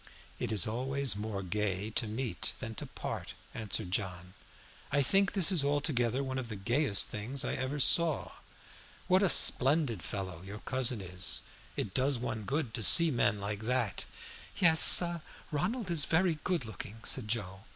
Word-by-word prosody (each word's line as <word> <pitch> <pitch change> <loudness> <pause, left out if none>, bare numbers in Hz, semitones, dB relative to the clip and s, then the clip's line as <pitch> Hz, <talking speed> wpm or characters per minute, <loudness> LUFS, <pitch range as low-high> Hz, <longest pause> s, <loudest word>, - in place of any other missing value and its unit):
"It - - -4
is 105 -5 +2
always 130 +3 -2
more 105 -1 -6
gay 100 +2 -3
to 110 - -2
meet 115 +2 -3
than 110 - -7
to - - -7
part," - - -8 0.2
answered 100 -4 -5
John. 90 -2 -5 0.6
"I 145 0 +1
think 195 +6 +1
this 195 -3 +3
is 170 -7 +1
altogether 140 -3 -1
one 130 -1 -4
of 120 -3 -8
the 110 - -6
gayest 110 +2 0
things 120 +6 -4
I - - -3
ever 135 +3 -4
saw. 160 +3 +2 0.8
What 185 +1 +3
a 195 - +2
splendid 135 - +3
fellow 95 -4 -6
your 100 +3 -10
cousin 130 -4 +1
is. 90 0 -1 0.3
It 95 - -4
does 135 +1 0
one 115 -3 -5
good 135 -3 -3
to 115 - -5
see 165 +9 +6
men 105 -5 0
like 100 +1 -5
that." 125 -4 -2 0.5
"Yes, 170 -2 +9 0.5
Ronald 185 - -3
is 155 -4 +2
very 165 -1 0
good 175 -8 -2
looking," 110 0 -9
said 125 -5 0
Joe. 105 -3 -5
120 Hz, 165 wpm, -30 LUFS, 105-145 Hz, 0.8 s, Yes